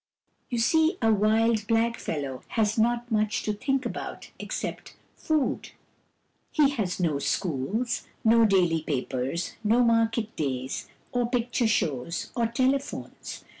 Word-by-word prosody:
You 245 - -2
see, 320 - +3
a 225 -2 +4
wild 215 +1 +2
blackfellow 210 - -1 0.2
has 215 -1 +3
not 240 +1 +1
much 215 0 +1
to 210 - 0
think 265 +5 -1
about - - -6
except - - -5 0.2
food. 310 -3 -1 0.8
He 290 -3 +4
has 210 -11 -2
no 160 -5 +1
schools, 185 - -1 0.2
no 230 +1 +6
daily 180 -5 +3
papers, 135 +2 -2
no 230 +4 +4
market 230 -1 +2
days, 130 -3 -3 0.2
or 245 -1 0
picture 240 -1 +1
shows, 165 - -1
or 235 -2 +2
tele 260 +4 +2
phones. 275 - -8
225 Hz, 130 wpm, -27 LUFS, 175-240 Hz, 0.8 s, no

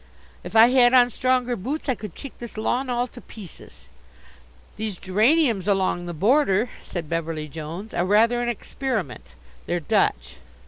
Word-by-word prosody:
If - - -9
I 225 +2 +8
had 250 -1 +5
on 245 -1 +5
stronger 250 0 0
boots 270 +11 -5
I 260 - +2
could 210 -6 -9
kick 275 - -10
this 235 -2 -9
lawn 250 +4 -1
all 245 0 0
to 245 0 -13
pieces." 195 -8 -14 0.9
"These 215 -3 -4
geraniums 215 - +2
along 190 -3 0
the 175 - -5
border," 225 - +2
said 170 -4 -6
Beverly 165 -1 -3
Jones, 165 +7 -8
"are 175 - 0
rather 225 +5 +3
an 240 - -1
experiment. 230 - -4 0.3
They're 175 - 0
Dutch." - - 0
220 Hz, 155 wpm, -23 LUFS, 175-245 Hz, 0.9 s, I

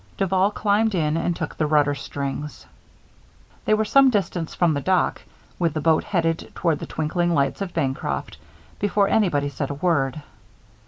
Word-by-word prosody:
Duval 190 0 +2
climbed 210 0 +1
in 155 -3 +1
and 170 +1 0
took - - -5
the 155 - 0
rudder 145 -1 +3
strings. 140 +1 -5 1.0
They 215 - +4
were 215 0 0
some 270 +5 +5
distance 185 -7 -2
from 170 -3 +2
the 140 - -2
dock, 185 +4 +1 0.4
with 165 -3 0
the - - 0
boat 160 +1 +2
headed 165 -3 -1
toward 165 -4 0
the - - -6
twinkling 170 +2 -1
lights 140 +5 0
of 185 -3 -4
Bancroft, 135 - -2 0.4
before 205 0 +2
anybody 170 -10 +2
said 140 0 -4
a 145 - -4
word. 145 -3 0
165 Hz, 165 wpm, -23 LUFS, 145-190 Hz, 1.0 s, some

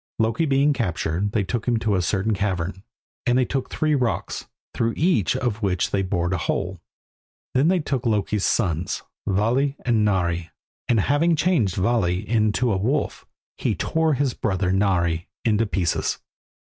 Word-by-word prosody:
Loki 115 +8 +1
being 140 +1 +3
captured, 95 - -1
they 105 - +2
took 115 +5 -3
him 120 -1 +3
to 110 -2 0
a 95 - +2
certain 100 +4 0
cavern, 95 -2 -2 0.5
and 120 +1 +4
they 130 - +3
took 135 +1 -3
three 155 -1 0
rocks, 125 -5 -1 0.3
through 115 0 0
each 160 - +2
of 115 -4 -2
which 95 -3 0
they 100 - +1
bored 90 -2 -1
a 95 - -1
hole. 90 +3 -2 0.7
Then 135 +4 +3
they 185 +2 +4
took 135 -5 -2
Loki's 105 -2 0
sons 85 -6 0 0.2
Vali 120 +8 +1
and 115 -3 +3
Nari, 85 -4 0 0.4
and 115 -4 +3
having 160 - +2
changed 145 - +1
Vali 95 -2 +1
into 110 +1 +2
a - - +1
wolf, 130 +10 -1 0.3
he - - 0
tore 160 -2 +1
his 135 -2 0
brother 95 -3 -1
Nari 90 -4 +1 0.2
into 110 0 +2
pieces. 90 -6 0
105 Hz, 160 wpm, -23 LUFS, 95-125 Hz, 0.7 s, and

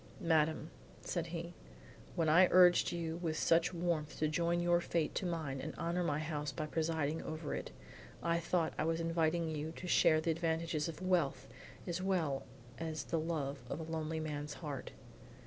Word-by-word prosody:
"Madame," 160 -3 +2 0.3
said 170 -2 -2
he 170 +1 -5 0.6
"when 165 -2 +1
I 175 +4 +7
urged 180 -1 +6
you 165 -1 -3
with 165 -3 -2
such 165 +1 +3
warmth 170 -3 -1
to 155 - +2
join 170 +2 +1
your 175 0 +3
fate 165 -3 0
to 185 - -1
mine 155 -6 -3
and 155 - -5
honor 175 +2 -1
my 145 -4 +1
house 150 -1 -2
by 155 - -3
presiding 160 -1 -1
over 155 -1 -4
it, - - -4 0.5
I 170 0 +2
thought 170 -1 0
I - - +2
was 165 +1 0
inviting 165 0 +1
you 155 0 -3
to 180 - -7
share 155 -2 +5
the 165 +1 +1
advantages 160 -1 0
of 165 +2 -6
wealth 170 -8 +1 0.4
as 175 +1 -2
well 170 -8 0 0.3
as 160 -1 -3
the 165 - -1
love 150 -4 -2
of 140 - -3
a - - -4
lonely 160 0 -3
man's 150 -1 -4
heart. 145 -6 -5
165 Hz, 180 wpm, -35 LUFS, 155-170 Hz, 0.6 s, I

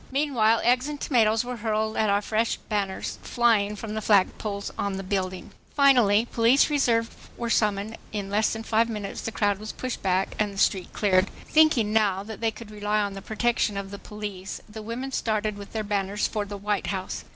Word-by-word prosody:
Meanwhile 250 -6 +2
eggs 250 +3 +3
and 295 -1 -5
tomatoes 225 -4 +2
were 250 0 -4
hurled 220 0 -1
at 215 - +2
our 200 +1 +2
fresh 225 +2 0
banners 200 -3 -3
flying 220 -4 +2
from 210 +1 -6
the 220 - -2
flag 200 -3 +3
poles 200 -2 -4
on 200 -1 -2
the 195 - -5
building. 185 -1 -3 0.2
Finally 245 -7 +5
police 245 +6 +4
reserves 235 -6 +2 0.3
were 235 -1 -2
summoned 210 0 +1
and - - -11 0.3
in - - -9
less 210 +1 +2
than 225 0 -4
five 225 +1 +2
minutes 210 -3 -5
the 225 - -4
crowd 205 -2 +1
was 215 0 -6
pushed 255 -1 -5
back 190 0 0
and 210 -1 +1
the 195 - -11
street 190 -2 +1
cleared. 190 -2 +2 0.2
Thinking 300 -9 +4
now 200 -3 +2
that 220 +1 -9
they 225 - +2
could 220 0 -10
rely 210 0 -1
on 200 -1 -1
the 195 - -7
protection 220 -1 0
of 195 0 -5
the 200 - -7
police, 205 -3 -6
the 215 0 -9
women 235 +5 -5
started 215 -4 -1
with 200 0 -10
their 220 -1 -2
banners 200 0 -1
for 210 -2 -2
the 205 0 -6
White 205 0 -2
House. 190 -2 -4
215 Hz, 205 wpm, -26 LUFS, 200-230 Hz, 0.3 s, Finally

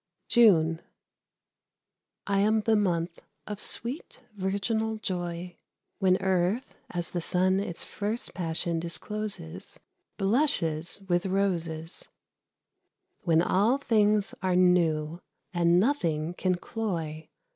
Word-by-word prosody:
JUNE. 165 -9 +5 1.4
I 200 -1 +1
am 215 +2 +3
the 220 +1 +3
month 175 -4 0 0.2
of 210 -1 -6
sweet, 255 +2 -4
virginal 210 +3 -1
joy, 175 -3 -4 0.4
When 185 -1 +4
Earth, 190 +5 +1 0.2
as 175 -1 -3
the 175 - -2
sun 185 +3 +2
its 175 -4 -3
first 215 +3 -4
passion 165 -1 0
discloses, 170 - -4 0.4
Blushes 195 - +1
with 175 +1 +1
roses, 170 -4 -1 1.2
When 165 -1 +4
all 210 +9 +3
things 210 -5 +2
are 185 -1 +1
new, 170 -3 +2 0.3
and 175 0 +4
nothing 170 - 0
can 185 0 0
cloy. 170 -6 -4
185 Hz, 105 wpm, -28 LUFS, 170-210 Hz, 1.4 s, JUNE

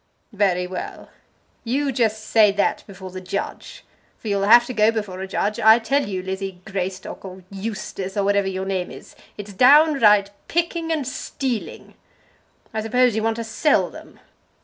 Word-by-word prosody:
"Very 190 -3 +1
well! 180 0 -7 0.5
You 275 +4 0
just 220 -3 0
say 215 -2 +5
that 200 - 0
before 190 -2 -10
the 185 0 -7
judge! 185 +2 -6 0.3
for 220 - -7
you'll 200 -1 +1
have 240 +2 +7
to 250 - -6
go 215 -1 +4
before 205 -4 -4
a 190 - -4
judge. 205 +2 -2
I 220 +1 +7
tell 240 +3 0
you, 185 -2 -3
Lizzie 190 -1 -5
Greystock, 190 -1 -5
or 190 -1 -10
Eustace, 195 -1 -5
or 200 - +2
whatever 200 0 +2
your 190 0 -3
name 190 -2 -2
is, - - -12 0.2
it's 205 -1 -8
downright 250 -5 +5 0.2
picking 335 -1 -1
and 300 -5 -1
stealing. 255 -2 -5 0.8
I 220 - -2
suppose 245 +1 +2
you 220 - 0
want 225 0 0
to 230 - -4
sell 225 +7 +1
them." - - -13
210 Hz, 170 wpm, -22 LUFS, 190-235 Hz, 0.8 s, have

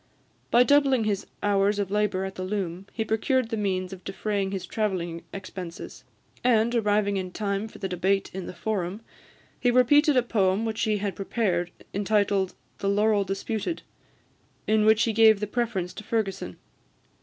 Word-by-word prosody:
By 240 +1 +6
doubling 275 -3 +4
his 205 -2 -1 0.2
hours 200 0 +2
of 200 -2 -2
labour 205 -2 +1
at 190 - -5
the 185 - -7
loom, 185 -1 -3
he 220 - -2
procured 225 +3 +1
the 225 - -1
means 190 -3 -1
of 185 -1 -11
defraying 195 0 -2
his 190 -2 -4
travelling 175 -5 -2
expenses; 185 -3 -8 0.4
and, 235 -1 +3
arriving 205 -3 +2
in 185 -1 -3
time 200 +1 -2
for - - -13
the 195 - -3
debate 190 +2 0
in 190 -1 -5
the - - -6
Forum, 200 -1 -3 0.6
he 245 - +2
repeated 280 +4 +5
a 250 - +4
poem 205 -2 +1
which 220 0 -2
he 215 -1 +1
had 200 -1 -3
prepared, 190 -4 -1 0.2
entitled 200 -1 +1 0.2
the 195 - 0
"Laurel 205 0 +3
Disputed," 210 - -3 0.8
in 215 0 +3
which 220 +1 +5
he 230 - +1
gave 220 -1 +6
the 210 - -1
preference 210 -5 -2
to 215 - -9
Fergusson. 200 - -2
205 Hz, 165 wpm, -26 LUFS, 190-220 Hz, 0.8 s, By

